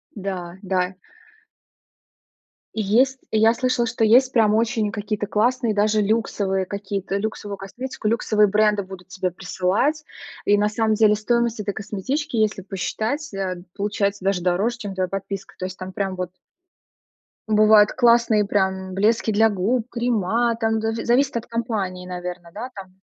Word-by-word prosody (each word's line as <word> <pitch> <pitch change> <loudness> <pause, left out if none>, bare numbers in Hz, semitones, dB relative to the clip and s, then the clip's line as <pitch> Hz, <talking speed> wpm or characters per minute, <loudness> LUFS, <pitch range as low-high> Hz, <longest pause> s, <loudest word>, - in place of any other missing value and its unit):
Да, 185 -3 -5
да. 185 0 0 1.8
Есть 240 +6 +2
я 220 +1 +4
слышала, 250 0 0
что 225 -1 0
есть 255 +4 +5
прям 215 -3 +3
очень 220 -2 +1
какие-то 210 -1 -3
классные, 235 +1 +1
даже 210 +1 +2
люксовые 200 -3 0
какие-то. 200 0 -3
Люксовую 205 -1 -4
косметику, 220 +3 -6
люксовые 215 -2 +3
бренды 210 0 +2
будут 185 -1 -11
тебе 185 -1 -2
присылать. 195 - -1 0.4
И 205 0 +4
на 210 +1 +2
самом 220 0 +1
деле 210 -1 +4
стоимость 235 +1 0
этой 205 -1 -2
косметички, 240 +7 -3
если 215 -2 +1
посчитать, 215 - -3
э, 185 -2 -3
получается 200 -1 -1
даже 195 -2 +1
дороже, 195 +7 0
чем 205 -5 -6
твоя 185 -1 -1
подписка. 195 0 -5
То 185 - -3
есть 185 0 -6
там 185 0 -7
прям 190 -1 -2
вот 180 -1 -3 1.2
бывают 215 -1 +6
классные 235 -4 +4
прям 190 -2 -1
блески 220 +3 +2
для 220 +2 +4
губ, 220 +5 0
крема 235 -1 0
там 225 -1 +1
да, 225 0 -1
зависит 240 +3 +1
от 235 - -5
компании, 210 -6 -3
наверно, 180 -1 -6
да, 240 +5 -6
там? 190 -2 -10
210 Hz, 150 wpm, -22 LUFS, 190-230 Hz, 1.8 s, бывают